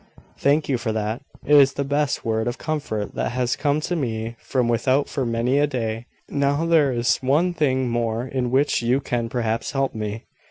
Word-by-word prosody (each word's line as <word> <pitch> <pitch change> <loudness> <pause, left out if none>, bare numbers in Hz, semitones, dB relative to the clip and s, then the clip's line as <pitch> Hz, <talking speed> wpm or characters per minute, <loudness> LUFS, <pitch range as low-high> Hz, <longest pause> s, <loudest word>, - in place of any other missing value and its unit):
"Thank 145 +2 +2
you 130 -4 0
for 115 -2 -2
that. 110 +3 -2 0.2
It 150 - +5
is 135 -1 +6
the 140 - -2
best 145 +1 -1
word 110 0 0
of 120 - -2
comfort 140 -10 -3
that - - -2
has 125 -1 0
come 145 0 +1
to 175 - -2
me 115 -6 -3
from 125 -3 -1
without 130 +4 +2
for 135 -4 -2
many 120 +4 +1
a 145 - +3
day. 115 -3 -3 0.2
Now 140 +3 0
there 160 -5 +4
is 120 -1 +1
one 150 +7 +1
thing 130 -5 +1
more 115 0 -1
in 130 -1 -2
which 135 +2 +2
you 120 +3 +2
can 120 -4 -2
perhaps 115 -1 -2
help 135 -1 0
me. 105 0 -4
130 Hz, 200 wpm, -23 LUFS, 115-140 Hz, 0.2 s, is